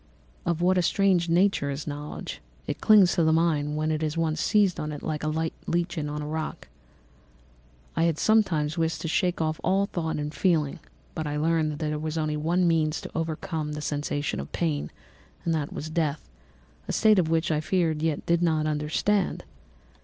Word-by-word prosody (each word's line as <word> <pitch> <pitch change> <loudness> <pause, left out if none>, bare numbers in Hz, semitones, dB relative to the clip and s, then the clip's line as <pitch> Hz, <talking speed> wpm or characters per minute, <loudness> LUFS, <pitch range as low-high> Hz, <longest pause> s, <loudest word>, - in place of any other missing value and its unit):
"Of 170 -1 0
what 185 +1 +4
a - - +4
strange 180 -2 +2
nature 175 -4 +2
is 140 +1 -4
knowledge! 150 0 -6 0.2
It - - -4
clings 205 -5 +6
to 170 - +2
the 160 - +4
mind 155 -2 +1
when 155 +1 0
it 155 0 -1
has 155 0 -2
once 160 -1 0
seized 205 -4 +3
on 150 0 -3
it 150 - -7
like 155 -1 -2
a - - 0 0.4
lichen 170 -3 -1
on 150 0 -4
the - - -4
rock. 155 +1 -4 1.3
I 165 - +3
wished 165 -2 0
sometimes 180 -9 +2
to 165 0 -1
shake 180 +1 0
off 155 -1 -1
all 195 +3 +2
thought 165 -4 -3
and 150 0 -3
feeling, 155 -3 +1 0.3
but 160 -1 -3
I 150 0 -2
learned 160 0 +1
that - - -6
there 150 -1 -2
was 155 +1 -3
but 155 -1 -1
one 175 +4 +1
means 160 -1 +1
to - - -8
overcome 160 -1 -3
the 150 - -5
sensation 145 - -2
of 70 - -6
pain, 155 -4 -1 0.6
and 165 - +1
that 150 -2 -2
was 155 +1 -6
death—a 100 - -5
state 210 -7 +4
which 165 0 +1
I 150 -1 +1
feared 160 -3 0
yet 160 -2 -1
did 170 0 +2
not 160 -3 +2
understand. 155 +6 0
160 Hz, 185 wpm, -26 LUFS, 150-170 Hz, 1.3 s, clings